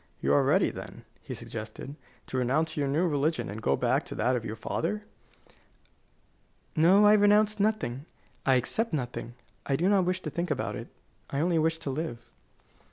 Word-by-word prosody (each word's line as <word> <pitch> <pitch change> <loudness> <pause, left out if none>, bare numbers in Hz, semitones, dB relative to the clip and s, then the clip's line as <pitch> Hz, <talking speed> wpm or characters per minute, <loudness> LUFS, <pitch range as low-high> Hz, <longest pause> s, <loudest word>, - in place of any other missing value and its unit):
"You 70 +1 +1
are - - +5
ready, - - +3
then," - - -9 0.2
he - - -7
suggested, 140 - -7 0.3
"to 130 - -4
renounce 145 +6 +1
your 145 -2 0
new 155 +6 +2
religion 155 - 0
and 105 +2 -6
go 70 - +2
back - - +1
to - - -6
that 130 +1 +1
of 120 - -2
your 110 -1 -4
father?" 200 - -2 1.7
"No; 180 +6 +6
I 210 - +7
renounce 210 0 +4
nothing, 195 - 0 0.4
I 135 - +4
accept 195 - 0
nothing. 120 -3 -4 0.3
I 140 - +2
do 170 +7 +1
not 195 -3 +4
wish 185 +1 -1
to - - -5
think 175 0 -2
about 150 - -2
it. - - -7 0.4
I 140 - -2
only 170 +1 +2
wish 160 +1 +1
to 160 -4 -4
live." 155 -2 -3
155 Hz, 180 wpm, -28 LUFS, 130-185 Hz, 1.7 s, I